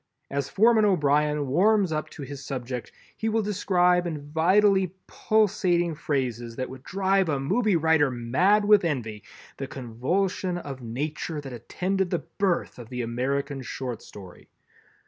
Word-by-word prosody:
As 140 Hz, -1 st, -2 dB
Foreman 220 Hz, +1 st, +4 dB
O'Brien 150 Hz, -5 st, +2 dB
warms 190 Hz, +6 st, +3 dB
up 155 Hz, -1 st, -2 dB
to 145 Hz, -, -9 dB
his 140 Hz, 0 st, -8 dB
subject 125 Hz, -2 st, -5 dB, 0.2 s
he 225 Hz, -, -2 dB
will 220 Hz, 0 st, +1 dB
describe 180 Hz, -3 st, +2 dB
in 150 Hz, -3 st, -6 dB
vitally 190 Hz, +3 st, +3 dB
pulsating 185 Hz, -5 st, +1 dB
phrases 125 Hz, -6 st, -2 dB
that 130 Hz, +1 st, -4 dB
would 130 Hz, -1 st, -10 dB
drive 190 Hz, +2 st, +1 dB
a 140 Hz, -3 st, 0 dB
movie 210 Hz, -, +1 dB
writer 160 Hz, -3 st, +3 dB
mad 150 Hz, -, +2 dB
with 210 Hz, -2 st, +6 dB
envy, 115 Hz, -10 st, -2 dB, 0.4 s
the 135 Hz, -, -4 dB
convulsion 175 Hz, -, -2 dB
of 140 Hz, -6 st, -7 dB
Nature 150 Hz, +6 st, -4 dB
that 135 Hz, -3 st, -8 dB
attended 185 Hz, -, -2 dB
the 175 Hz, -, -2 dB
birth 190 Hz, -9 st, 0 dB
of 115 Hz, -2 st, -10 dB
the 125 Hz, -1 st, -3 dB
American 135 Hz, +4 st, -2 dB
Short 125 Hz, -2 st, -5 dB
Story. 95 Hz, -4 st, -13 dB
155 Hz, 145 wpm, -26 LUFS, 130-190 Hz, 0.4 s, with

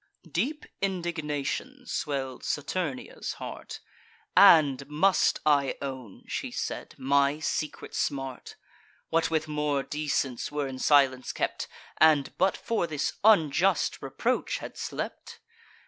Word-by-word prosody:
Deep 265 Hz, -, -1 dB, 0.2 s
indignation 175 Hz, -, -3 dB
swell'd 135 Hz, -, -3 dB
Saturnia's 145 Hz, -2 st, -3 dB
heart: -, -, -8 dB, 0.6 s
"And 140 Hz, -4 st, +7 dB
must 170 Hz, +6 st, +3 dB
I 140 Hz, -3 st, +3 dB
own," 130 Hz, -7 st, -7 dB
she -, -, -3 dB
said, -, -, -5 dB
"my 140 Hz, +2 st, +2 dB
secret 155 Hz, -1 st, -3 dB
smart— 135 Hz, -3 st, -3 dB, 0.5 s
What 165 Hz, 0 st, +2 dB
with 160 Hz, -1 st, 0 dB
more 150 Hz, -2 st, 0 dB
decence 140 Hz, -4 st, -2 dB
were 145 Hz, -1 st, -1 dB
in 130 Hz, -1 st, -7 dB
silence 135 Hz, -3 st, +3 dB
kept, -, -, -2 dB, 0.3 s
And, 155 Hz, -3 st, +4 dB
but 190 Hz, +1 st, +3 dB
for 225 Hz, -7 st, -1 dB
this 150 Hz, -3 st, -2 dB
unjust 195 Hz, -3 st, +3 dB
reproach, -, -, -1 dB
had -, -, -8 dB
slept? -, -, -6 dB
150 Hz, 115 wpm, -28 LUFS, 140-170 Hz, 0.6 s, And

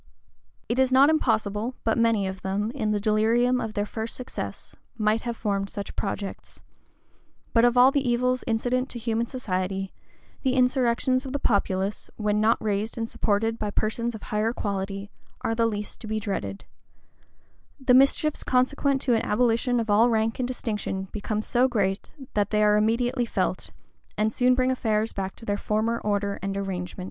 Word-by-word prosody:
[] -, -, -41 dB
It 240 Hz, -, 0 dB
is 260 Hz, -1 st, +3 dB
not 275 Hz, +4 st, +6 dB
impossible 225 Hz, -4 st, 0 dB
but 225 Hz, -, +2 dB
many 230 Hz, -3 st, +2 dB
of 190 Hz, 0 st, -5 dB
them, 200 Hz, +4 st, -1 dB
in 235 Hz, -5 st, -2 dB
the 210 Hz, -1 st, +1 dB
delirium 230 Hz, +4 st, +2 dB
of 220 Hz, -1 st, -5 dB
their 205 Hz, -, 0 dB
first 220 Hz, +2 st, -4 dB
success, 255 Hz, -, -7 dB, 0.2 s
might 215 Hz, 0 st, +2 dB
have 235 Hz, -2 st, -4 dB
formed 200 Hz, -2 st, -1 dB
such 200 Hz, 0 st, -6 dB
projects: 195 Hz, -1 st, -5 dB, 0.9 s
but 230 Hz, -, +5 dB
of 245 Hz, 0 st, +4 dB
all 255 Hz, +2 st, +7 dB
the 280 Hz, -, +1 dB
evils 250 Hz, +1 st, +1 dB
incident 250 Hz, +3 st, 0 dB
to -, -, -5 dB
human 230 Hz, 0 st, -1 dB
society, 195 Hz, -5 st, -3 dB, 0.5 s
the 260 Hz, -1 st, +1 dB
insurrections 255 Hz, 0 st, +2 dB
of 265 Hz, -1 st, -6 dB
the 285 Hz, -, -1 dB
populace, 195 Hz, 0 st, -1 dB
when 210 Hz, -1 st, 0 dB
not 225 Hz, +2 st, +4 dB
raised 210 Hz, +2 st, -2 dB
and 225 Hz, 0 st, -3 dB
supported 225 Hz, +2 st, 0 dB
by 210 Hz, -, -2 dB
persons 225 Hz, +3 st, -1 dB
of 215 Hz, -, -10 dB
higher 215 Hz, +1 st, 0 dB
quality, 200 Hz, -2 st, -4 dB, 0.3 s
are 225 Hz, -, 0 dB
the 230 Hz, 0 st, +2 dB
least 210 Hz, -2 st, -4 dB
to 225 Hz, -, -7 dB
be 215 Hz, 0 st, -1 dB
dreaded: 105 Hz, -, -4 dB, 1.1 s
the 260 Hz, -2 st, +3 dB
mischiefs 275 Hz, +3 st, +3 dB
consequent 270 Hz, +2 st, +1 dB
to 250 Hz, -, +2 dB
an 225 Hz, -, +2 dB
abolition 240 Hz, +2 st, +2 dB
of 225 Hz, -2 st, -1 dB
all 225 Hz, +4 st, +5 dB
rank 225 Hz, 0 st, 0 dB
and 250 Hz, -, 0 dB
distinction 210 Hz, -6 st, -3 dB
become 215 Hz, +1 st, -3 dB
so 245 Hz, +3 st, +3 dB
great, 200 Hz, -6 st, -1 dB, 0.2 s
that 205 Hz, -1 st, +1 dB
they 210 Hz, 0 st, +2 dB
are 210 Hz, 0 st, +5 dB
immediately 240 Hz, +4 st, +1 dB
felt, 235 Hz, -, -2 dB, 0.5 s
and 215 Hz, +1 st, +1 dB
soon 250 Hz, 0 st, +3 dB
bring 255 Hz, 0 st, +2 dB
affairs 220 Hz, -3 st, 0 dB
back 190 Hz, -1 st, -4 dB
to 230 Hz, -, -10 dB
their 205 Hz, -1 st, 0 dB
former 220 Hz, +3 st, 0 dB
order 200 Hz, -1 st, -1 dB
and 195 Hz, 0 st, -3 dB
arrangement. 185 Hz, -2 st, -4 dB
225 Hz, 180 wpm, -26 LUFS, 205-245 Hz, 1.1 s, all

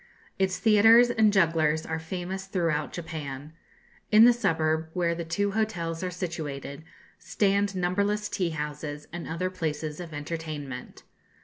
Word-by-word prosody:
Its 190 Hz, -1 st, +1 dB
theatres 225 Hz, +2 st, +6 dB
and 220 Hz, -3 st, +4 dB
jugglers 160 Hz, -4 st, +2 dB
are 160 Hz, 0 st, -3 dB
famous 185 Hz, +3 st, -5 dB
throughout 165 Hz, -6 st, -1 dB
Japan. 150 Hz, -3 st, -6 dB, 0.6 s
In 215 Hz, +2 st, +8 dB
the 245 Hz, -, +7 dB
suburb, 160 Hz, -7 st, 0 dB
where 175 Hz, -2 st, +1 dB
the 170 Hz, 0 st, -4 dB
two 200 Hz, +5 st, -1 dB
hotels 180 Hz, -6 st, -2 dB
are 185 Hz, -, -2 dB
situated, 160 Hz, -5 st, -5 dB, 0.4 s
stand 200 Hz, -1 st, +1 dB
numberless 200 Hz, +4 st, 0 dB
tea 180 Hz, -4 st, -1 dB
houses 150 Hz, -1 st, -5 dB
and 175 Hz, -1 st, -6 dB
other 180 Hz, +3 st, -2 dB
places 155 Hz, -3 st, -3 dB
of 170 Hz, -2 st, -7 dB
entertainment. 150 Hz, -3 st, -6 dB
170 Hz, 135 wpm, -27 LUFS, 155-195 Hz, 0.6 s, In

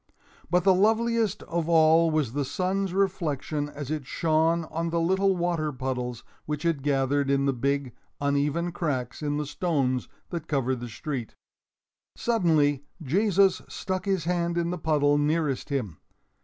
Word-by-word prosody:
But 180 Hz, +1 st, +3 dB
the 190 Hz, -, +6 dB
loveliest 220 Hz, +1 st, +2 dB
of 170 Hz, -1 st, -2 dB
all 165 Hz, 0 st, +5 dB
was 155 Hz, -7 st, 0 dB
the 145 Hz, +1 st, 0 dB
sun's 190 Hz, +6 st, -1 dB
reflection 160 Hz, -6 st, -1 dB
as 145 Hz, -1 st, -7 dB
it 150 Hz, -4 st, -3 dB
shone 165 Hz, +2 st, +2 dB
on 165 Hz, +1 st, -2 dB
the 170 Hz, 0 st, 0 dB
little 190 Hz, +3 st, +2 dB
water 170 Hz, -3 st, 0 dB
puddles 125 Hz, -2 st, -4 dB, 0.2 s
which 150 Hz, -1 st, -3 dB
had 165 Hz, -4 st, 0 dB
gathered 140 Hz, 0 st, +1 dB
in 140 Hz, 0 st, +2 dB
the 140 Hz, -, +2 dB
big, 140 Hz, 0 st, -1 dB, 0.3 s
uneven 145 Hz, +4 st, 0 dB
cracks 140 Hz, -8 st, -3 dB
in 145 Hz, -1 st, -1 dB
the 150 Hz, -, -2 dB
stones 140 Hz, -4 st, -1 dB, 0.2 s
that 165 Hz, -3 st, -4 dB
covered 130 Hz, -3 st, 0 dB
the 120 Hz, 0 st, -6 dB
street. 125 Hz, -1 st, -5 dB, 0.8 s
Suddenly 155 Hz, -, +2 dB, 0.2 s
Jesus 195 Hz, +5 st, +3 dB
stuck 185 Hz, 0 st, -3 dB
his 190 Hz, -4 st, 0 dB
hand 170 Hz, 0 st, 0 dB
in 170 Hz, 0 st, 0 dB
the 180 Hz, -, -4 dB
puddle 145 Hz, -2 st, +2 dB
nearest 150 Hz, -2 st, 0 dB
him. 110 Hz, -, -3 dB
155 Hz, 155 wpm, -27 LUFS, 140-175 Hz, 0.8 s, the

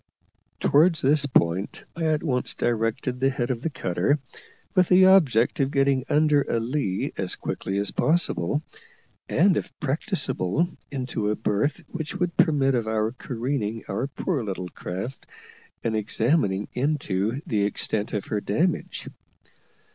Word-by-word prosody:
Towards 160 Hz, +3 st, +4 dB
this 145 Hz, +1 st, +3 dB
point 95 Hz, -6 st, +1 dB
I 165 Hz, -1 st, -2 dB
at 155 Hz, -1 st, +1 dB
once 125 Hz, -6 st, 0 dB
directed 120 Hz, +2 st, -1 dB
the 135 Hz, +1 st, +3 dB
head 130 Hz, -2 st, -1 dB
of 120 Hz, -2 st, -3 dB
the 165 Hz, -, -1 dB
cutter, 95 Hz, -, 0 dB, 0.6 s
with 185 Hz, -3 st, +3 dB
the 185 Hz, +1 st, +7 dB
object 145 Hz, -, +4 dB
of 135 Hz, -1 st, +2 dB
getting 135 Hz, -2 st, +2 dB
under 150 Hz, -1 st, +4 dB
a 115 Hz, -, -1 dB
lee 115 Hz, -5 st, -2 dB
as -, -, 0 dB
quickly 95 Hz, -, -3 dB
as 100 Hz, 0 st, 0 dB
possible, 150 Hz, -, +1 dB, 0.7 s
and, 185 Hz, +2 st, +4 dB
if -, -, -3 dB
practicable, 150 Hz, -, -1 dB, 0.2 s
into 125 Hz, -6 st, -2 dB
a 105 Hz, -, +1 dB
berth 110 Hz, +7 st, -1 dB
which 160 Hz, -2 st, -5 dB
would 180 Hz, -2 st, -1 dB
permit 145 Hz, -6 st, +3 dB
of 115 Hz, -3 st, 0 dB
our 110 Hz, 0 st, 0 dB
careening 120 Hz, -3 st, -3 dB
our 110 Hz, +7 st, -2 dB
poor 145 Hz, 0 st, -2 dB
little 95 Hz, -3 st, -4 dB
craft 95 Hz, +12 st, -6 dB, 0.6 s
and 115 Hz, -1 st, 0 dB
examining 110 Hz, -1 st, +1 dB
into 125 Hz, -5 st, -1 dB
the 110 Hz, -, 0 dB
extent 105 Hz, +1 st, -1 dB
of 105 Hz, -2 st, -2 dB
her 105 Hz, -1 st, -2 dB
damage. 160 Hz, -, -1 dB
130 Hz, 145 wpm, -25 LUFS, 110-150 Hz, 0.7 s, the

